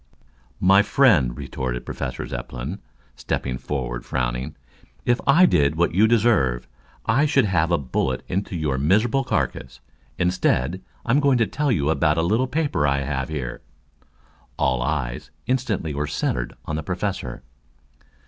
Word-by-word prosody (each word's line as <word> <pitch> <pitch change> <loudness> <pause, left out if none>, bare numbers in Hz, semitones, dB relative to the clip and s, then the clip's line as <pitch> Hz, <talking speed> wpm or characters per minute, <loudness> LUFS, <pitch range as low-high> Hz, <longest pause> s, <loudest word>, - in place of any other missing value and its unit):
"My 95 +2 +6
friend," 100 - +3
retorted 65 -2 -4
Professor 60 - -4
Zepplin, 65 +8 -6 0.4
stepping 65 -2 -3
forward - - -4
frowning. 65 +3 -2 0.5
"If 120 0 +2
I 165 +7 +7
did 70 - +3
what 85 +1 +1
you 105 +5 +5
deserve, 95 - +2 0.4
I 145 +3 +3
should 140 -4 +3
send 85 -2 +2
a 85 - +4
bullet 65 -2 -2
into 95 0 -2
your 75 -5 -1
miserable 110 - +2
carcass. 65 - -2 0.4
Instead 90 -2 +1 0.2
I'm 125 +5 +3
going 140 -3 +3
to 115 - +3
tell 145 +5 -1
you 75 -8 +1
about 80 -1 +2
a 80 - +2
little 110 +9 +1
paper 140 - 0
I 70 0 +1
have 65 0 -3
here." 70 -6 -4 1.0
All 65 -2 +1
eyes 65 -3 -2 0.2
instantly 115 - -1
were 75 +1 -2
centered 60 -4 -2
on 75 - -3
the - - -2
Professor. 60 -4 -4
80 Hz, 145 wpm, -23 LUFS, -, 1.0 s, I